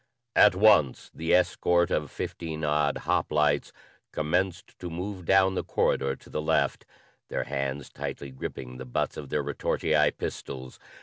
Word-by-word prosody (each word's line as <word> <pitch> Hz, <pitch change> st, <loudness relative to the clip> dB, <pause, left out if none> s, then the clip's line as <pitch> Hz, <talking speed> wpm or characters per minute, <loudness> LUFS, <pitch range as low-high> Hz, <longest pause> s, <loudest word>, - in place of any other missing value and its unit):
At 105 Hz, -3 st, +7 dB
once 95 Hz, -10 st, +4 dB
the 80 Hz, +1 st, -2 dB
escort 90 Hz, -1 st, +2 dB
of 75 Hz, -3 st, 0 dB
fifteen 80 Hz, -2 st, -5 dB
odd 75 Hz, -1 st, +1 dB
hoplites 75 Hz, -2 st, +1 dB, 0.4 s
commenced 90 Hz, +4 st, -1 dB
to 90 Hz, -, -5 dB
move 90 Hz, +2 st, -5 dB
down 95 Hz, +1 st, +4 dB
the -, -, -2 dB
corridor 70 Hz, 0 st, +1 dB
to -, -, -18 dB
the 75 Hz, -, -2 dB
left, 80 Hz, +1 st, 0 dB, 0.4 s
their -, -, -2 dB
hands 70 Hz, 0 st, -3 dB
tightly 70 Hz, -, -6 dB
gripping 65 Hz, -1 st, -7 dB
the 65 Hz, -, -7 dB
butts 60 Hz, -, -2 dB
of 70 Hz, -, -7 dB
their -, -, 0 dB
retortii -, -, +1 dB
pistols. 65 Hz, -1 st, -6 dB
75 Hz, 145 wpm, -27 LUFS, 70-90 Hz, 0.4 s, At